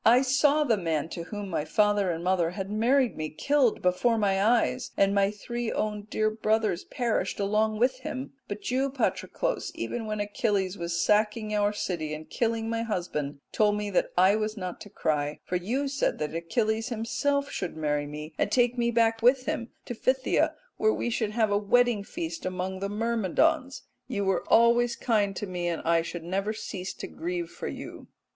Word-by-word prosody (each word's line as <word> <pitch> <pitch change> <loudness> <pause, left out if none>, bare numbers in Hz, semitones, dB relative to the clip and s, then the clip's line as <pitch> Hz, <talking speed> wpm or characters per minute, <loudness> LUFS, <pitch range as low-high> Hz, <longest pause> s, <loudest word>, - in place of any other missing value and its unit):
I 245 +3 +6
saw 285 +3 +3
the 235 -7 +2
man 165 -4 -1
to 170 0 -6
whom 205 +1 -6
my 165 -4 -1
father 205 +3 +2
and 165 0 -2
mother 180 -2 +2
had 195 +2 -5
married 245 +4 +2
me 155 -1 -3
killed 270 - +1
before 180 +6 +2
my 195 -2 +2
eyes, 240 +2 +2
and 195 0 +4
my 200 -1 +3
three 235 +3 -4
own 210 -1 -2
dear 215 0 +1
brothers 215 -4 0
perished 235 -4 -1
along 215 +2 +1
with 250 +4 +2
him; 275 -3 -5
but 205 +3 -4
you, 265 +2 +1
Patroclus, 280 - -1
even 230 -2 -4
when 215 0 -3
Achilles 205 -2 0
was 170 -2 -3
sacking 215 +1 +2
our 205 0 +2
city 165 -7 -3
and 155 +1 -9
killing 225 -1 0
my 230 0 -1
husband, 175 -10 -3
told 210 -1 +3
me 210 -1 -3
that 185 - +2
I 190 +3 +6
was 215 0 -2
not 185 -2 -5
to 205 - -9
cry; 150 -4 -1
for 180 - -3
you 245 +11 -1
said 275 0 0
that 150 0 -3
Achilles 220 +8 -1
himself 280 +5 -1
should 175 -4 -4
marry 150 -1 0
me, 150 +2 -7
and - - +1
take 245 0 +2
me 235 0 +2
back 225 -1 +2
with 255 +2 +4
him 235 -1 -2 0.2
to - - -4
Phthia, 260 +3 +1 0.2
where 435 - +3
we 240 - -2
should 225 -2 0
have 215 -1 +1
a 205 - +3
wedding 235 0 +3
feast 325 +7 -5
among 185 +1 -3
the 200 +1 -2
Myrmidons. 235 - +1 0.2
You 200 -1 -2
were 190 -2 +1
always 235 +1 +4
kind 205 -5 +1
to 205 - -3
me, 180 -2 -3
and 170 -2 -2
I 165 0 +3
should 170 0 -6
never 195 +5 -1
cease 195 -3 -5
to - - -6
grieve 345 +1 -4
for - - -6
you." - - -8
210 Hz, 195 wpm, -28 LUFS, 185-240 Hz, 0.2 s, I